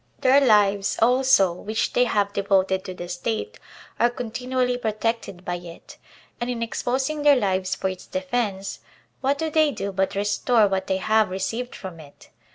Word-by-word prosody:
Their 270 Hz, +2 st, +5 dB
lives, 205 Hz, -4 st, +3 dB
also, 250 Hz, -6 st, +4 dB
which 215 Hz, +5 st, -2 dB
they 250 Hz, -, +4 dB
have 200 Hz, -3 st, 0 dB
devoted 190 Hz, -1 st, +1 dB
to 185 Hz, -, -6 dB
the 175 Hz, -, -7 dB
State, 225 Hz, -, -4 dB, 0.4 s
are 240 Hz, -, +4 dB
continually 250 Hz, +1 st, -2 dB
protected 220 Hz, -5 st, -3 dB
by 175 Hz, 0 st, -2 dB
it; 175 Hz, -1 st, -12 dB, 0.4 s
and 240 Hz, +1 st, -3 dB
in 235 Hz, -2 st, -2 dB
exposing 265 Hz, +6 st, -2 dB
their 290 Hz, -1 st, +6 dB
lives 190 Hz, -5 st, 0 dB
for 190 Hz, -, -2 dB
its 185 Hz, -1 st, -6 dB
de 280 Hz, -, -3 dB
fense, 225 Hz, -8 st, -2 dB, 0.4 s
what 275 Hz, +1 st, +1 dB
do 320 Hz, 0 st, -2 dB
they 310 Hz, -1 st, +4 dB
do 200 Hz, -7 st, -4 dB
but 190 Hz, 0 st, -1 dB
restore 205 Hz, +2 st, +2 dB
what 190 Hz, -1 st, -2 dB
they 190 Hz, -, +1 dB
have 215 Hz, +2 st, +2 dB
received 225 Hz, +7 st, -3 dB
from 185 Hz, -4 st, -8 dB
it 145 Hz, -2 st, -15 dB
215 Hz, 170 wpm, -24 LUFS, 190-250 Hz, 0.4 s, their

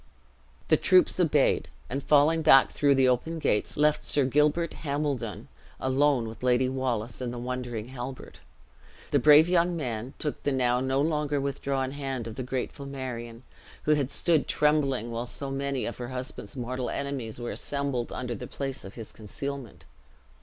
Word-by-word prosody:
The -, -, +6 dB
troops 365 Hz, -, +4 dB
obeyed, 150 Hz, -5 st, +2 dB, 0.2 s
and 140 Hz, +3 st, -3 dB
falling 150 Hz, +2 st, +4 dB
back 135 Hz, -3 st, +6 dB
through 140 Hz, -1 st, +3 dB
the 130 Hz, -1 st, +4 dB
open 130 Hz, +7 st, 0 dB
gates, 105 Hz, -9 st, 0 dB
left 150 Hz, +1 st, +3 dB
Sir 145 Hz, -2 st, +2 dB
Gilbert 150 Hz, +5 st, +2 dB
Hambledon 140 Hz, -, -2 dB, 0.3 s
alone 130 Hz, -2 st, +2 dB
with 110 Hz, -2 st, -9 dB
Lady 125 Hz, 0 st, +3 dB
Wallace 125 Hz, -3 st, -2 dB
and 125 Hz, -1 st, -2 dB
the 120 Hz, -, -6 dB
wondering 125 Hz, -2 st, -4 dB
Halbert. 130 Hz, 0 st, -8 dB, 0.7 s
The 145 Hz, -, +4 dB
brave 150 Hz, +4 st, +7 dB
young 175 Hz, -1 st, +2 dB
man 125 Hz, -3 st, -4 dB
took 150 Hz, -, -3 dB
the 145 Hz, -, 0 dB
now 125 Hz, -2 st, +2 dB
no 130 Hz, +1 st, 0 dB
longer 150 Hz, -1 st, 0 dB
withdrawn 135 Hz, -1 st, -2 dB
hand 135 Hz, -4 st, -4 dB
of 115 Hz, -, -6 dB
the 130 Hz, -, -5 dB
grateful 130 Hz, +2 st, -4 dB
Marion, 125 Hz, -3 st, -6 dB, 0.4 s
who 150 Hz, -, +4 dB
had 140 Hz, -3 st, 0 dB
stood 165 Hz, -1 st, +1 dB
trembling 140 Hz, -6 st, +1 dB
while 115 Hz, +1 st, -3 dB
so 135 Hz, +2 st, -3 dB
many 135 Hz, -1 st, -2 dB
of 120 Hz, -, -5 dB
her 120 Hz, -, -5 dB
husband's 125 Hz, -5 st, -6 dB
mortal 125 Hz, 0 st, -3 dB
enemies 135 Hz, -5 st, -4 dB
were 120 Hz, -, -4 dB
assembled 140 Hz, -4 st, -2 dB
under 125 Hz, -1 st, -4 dB
the 110 Hz, -, -7 dB
place 135 Hz, -2 st, -5 dB
of 95 Hz, -, -10 dB
his 115 Hz, -3 st, -8 dB
concealment. 135 Hz, +3 st, -7 dB
135 Hz, 165 wpm, -28 LUFS, 125-145 Hz, 0.7 s, brave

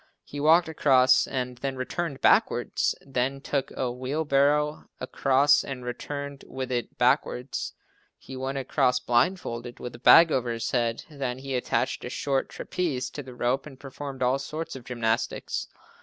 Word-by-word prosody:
He 145 Hz, -, -8 dB
walked 160 Hz, +4 st, +5 dB
across 130 Hz, -5 st, +4 dB
and 125 Hz, -2 st, -4 dB
then 135 Hz, 0 st, -3 dB
returned 140 Hz, +3 st, -4 dB
backwards. -, -, +2 dB
Then 135 Hz, 0 st, -1 dB
took 140 Hz, -1 st, -2 dB
a 125 Hz, -2 st, -1 dB
wheel 130 Hz, +6 st, -3 dB
barrow 150 Hz, +2 st, +2 dB
across 135 Hz, +2 st, +3 dB
and 125 Hz, -2 st, -6 dB
returned 140 Hz, +3 st, -5 dB
with 130 Hz, -1 st, -5 dB
it 120 Hz, -1 st, -3 dB
backwards. 125 Hz, +1 st, 0 dB, 0.4 s
He 130 Hz, -, -10 dB
went 135 Hz, +1 st, -3 dB
across 130 Hz, -1 st, +1 dB
blindfolded 120 Hz, -2 st, 0 dB
with 120 Hz, -, -6 dB
a 120 Hz, -, -11 dB
bag 165 Hz, +5 st, +8 dB
over 125 Hz, -3 st, 0 dB
his 115 Hz, -1 st, -3 dB
head. 120 Hz, -2 st, 0 dB
Then 135 Hz, -5 st, -4 dB
he 135 Hz, +1 st, -6 dB
attached 125 Hz, -, -1 dB
a -, -, -5 dB
short 135 Hz, -2 st, -1 dB
trapeze 130 Hz, -8 st, -3 dB
to 145 Hz, -, -6 dB
the 130 Hz, -2 st, -11 dB
rope 125 Hz, +4 st, 0 dB
and 135 Hz, -3 st, -12 dB
performed 135 Hz, -1 st, -6 dB
all 130 Hz, +2 st, +2 dB
sorts 155 Hz, +3 st, -5 dB
of 130 Hz, -3 st, -10 dB
gymnastics. 115 Hz, -2 st, -2 dB
130 Hz, 160 wpm, -26 LUFS, 125-140 Hz, 0.4 s, bag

